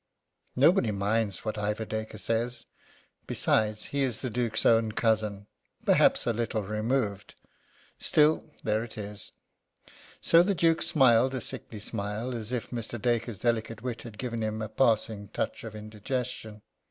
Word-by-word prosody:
Nobody 140 - +4
minds 105 0 -1
what 110 -1 -2
Ivor 105 +1 -1
Dacre 110 0 -4
says. 115 +3 -2 0.6
Besides, 105 0 +1
he 140 - +1
is 125 -5 +1
the 130 - -2
Duke's 115 -2 0
own 115 -1 +4
cousin. 110 -3 0 0.4
Perhaps - - +4
a 120 - +1
little 115 -1 -1
removed; 105 0 -2 0.6
still, 155 +1 +3 0.2
there 110 +1 +1
it 120 - -9
is. 105 -1 -6 0.9
So 165 - +6
the 195 +2 +1
Duke 165 -1 +3
smiled 130 -2 +4
a - - -1
sickly 110 -2 -6
smile, 105 +5 -3
as 115 -1 -5
if 125 -3 -3
Mr. 120 -1 -4
Dacre's 120 -2 0
delicate 115 0 -1
wit 125 -2 -4
had 115 -3 -10
given 115 -1 -3
him 110 0 -2
a 110 - -5
passing 110 -3 +1
touch 100 - -3
of 110 -2 -7
indigestion. 110 0 -5
110 Hz, 150 wpm, -28 LUFS, 105-125 Hz, 0.9 s, So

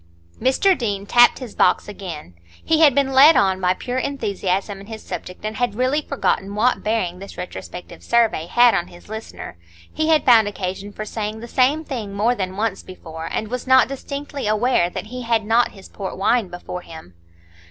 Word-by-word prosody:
Mr 265 - +3
Deane 205 - -3
tapped 240 +3 +5
his 250 -5 -8
box - - +2
again. 175 - -8 0.3
He 320 -1 +2
had 290 -5 +6
been 275 -1 +2
led 285 +5 +8
on 190 -1 +2
by 180 0 +2
pure 250 +4 -3
enthusiasm 200 -7 -2
in 200 - -13
his 220 -1 -8
subject, 180 +3 -7
and 215 0 -4
had 245 -4 -1
really 255 +5 +1
forgotten 205 -8 -1
what 245 +4 +2
bearing 190 -5 -1
this 195 - -10
retrospective 180 0 -8
survey 225 -8 +1
had 240 +4 +5
on 175 - 0
his 175 +3 -16
listener. 220 - -8 0.3
He 315 0 -1
had 315 -1 +3
found 225 -4 +6
occasion 195 0 -5
for 215 +1 -6
saying 215 0 -4
the 235 - -8
same 270 +6 +2
thing 225 -9 -6
more 220 +4 +2
than 190 -4 -4
once 210 -2 -1
before, 165 -3 -9
and 215 - -3
was 250 +2 -5
not 260 0 +6
distinctly 280 -1 -5
aware 215 -4 +2
that 180 - -6
he 250 - -5
had 230 -3 0
not 230 +2 +2
his 195 -2 -13
port 195 -2 -7
wine 220 +2 +2
before 180 0 -7
him. 160 - -12
220 Hz, 195 wpm, -21 LUFS, 190-250 Hz, 0.3 s, led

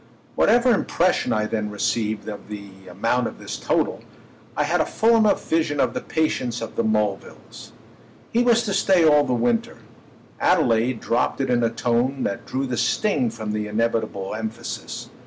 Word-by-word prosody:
Whatever 245 +1 +4
impression 185 -3 +1
I 110 0 +1
then 105 -1 -2
received 105 +1 -2
of 105 -2 -7
the 100 -2 -10
amount 115 +7 0
of - - -8
this - - -6
total, - - -1 0.6
I - - +2
had - - +1
a - - +1
full 230 +1 +3
enough 215 -2 +2
vision 155 -3 0
of - - +2
the - - -3
patience 125 -7 -1
of 115 - -7
the - - 0
Mulvilles. 105 -2 -3 0.6
He 235 - +3
was 235 -1 +3
to 200 - -2
stay 185 -4 +3
all 150 -2 +5
the - - -1
winter: 120 -1 0 0.6
Adelaide 115 +1 +2
dropped 115 - 0
it 135 -2 0
in 120 -1 +2
a 115 - +3
tone 120 +3 0
that 100 - -3
drew 135 +1 -2
the 125 -2 -3
sting 145 - +1
from 110 -2 -5
the 105 0 -2
inevitable 110 -3 -1
emphasis. 110 +2 -6
115 Hz, 175 wpm, -23 LUFS, 110-145 Hz, 0.6 s, all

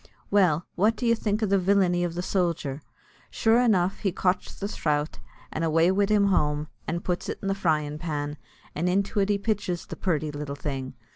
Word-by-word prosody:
Well, 180 -5 +3
what 210 +5 +2
would 245 - 0
you 230 - +5
think 215 -1 -1
o' - - +4
the 195 -1 +2
villainy 180 -2 +3
of 170 -1 -2
the 175 - -2
sojer? 170 -7 -1 0.5
Sure 225 +1 +3
enough 195 -6 +2
he 195 - 0
cotch 180 +1 -1
the 200 - -4
throut, 150 -6 -1 0.3
and 160 - -3
away 165 +2 +3
wid 200 +1 +2
him 205 -1 +4
home, 150 -4 +1 0.2
and 170 +1 -2
puts 180 -1 -2
an - - -2
the 195 -1 0
fryin' 155 -6 0
pan, 150 -2 -3 0.4
and 170 +4 0
into 200 +3 +1
it 195 0 +2
he 205 - +3
pitches 200 -4 -2
the - - -7
purty 155 -5 -1
little 145 -1 -5
thing. 135 -2 -5
180 Hz, 200 wpm, -26 LUFS, 155-200 Hz, 0.5 s, you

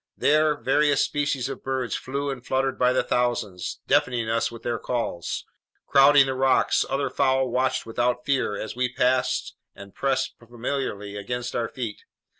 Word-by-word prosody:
There 150 0 +3
various 145 +1 +2
species 145 -3 -1
of 135 -1 -7
birds 130 -4 -2
flew 140 +2 -3
and 130 -3 -7
fluttered 130 0 -1
by 125 0 +4
the 130 - +2
thousands, 115 -7 -1
deafening 120 -2 +1
us 115 0 +1
with 115 -1 -11
their 120 -1 -2
calls. 100 -8 -3 0.4
Crowding 140 0 +6
the 135 - -2
rocks, 130 0 +3
other 140 +1 -1
fowl 130 -1 +2
watched 130 +2 0
without 120 +2 -1
fear 130 -7 0
as 110 - -5
we 125 0 0
passed 130 0 +1 0.2
and 100 0 -12
pressed 135 -1 0
familiarly 115 -3 -4
against 120 +4 -4
our 115 -1 -1
feet. 115 -5 -5
125 Hz, 160 wpm, -25 LUFS, 120-135 Hz, 0.4 s, Crowding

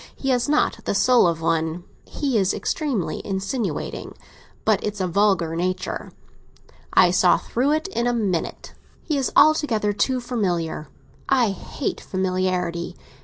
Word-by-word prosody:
He 270 - -3
has 250 +1 +1
not 300 -5 +2
the - - -1
soul 245 -2 +5
of 165 -1 -1
one. 160 +1 0 0.2
He 275 -4 -2
is 195 -3 +2
extremely 230 - -2
insinuating; 195 +4 -3 0.5
but 215 -2 +2
it's 210 0 -3
a 185 - 0
vulgar 180 -3 +2
nature. 185 +2 -3 0.8
I - - +5
saw - - +4
through 265 +5 0
it 315 +4 -1
in 235 -10 -1
a - - +3
minute. 200 -8 -2 0.3
He 305 - -1
is 270 -2 0
altogether 240 -10 +4
too 255 +5 +1
familiar—I 205 - -2
hate 195 - -4
familiarity. 185 -2 -1
205 Hz, 135 wpm, -23 LUFS, 180-250 Hz, 0.8 s, soul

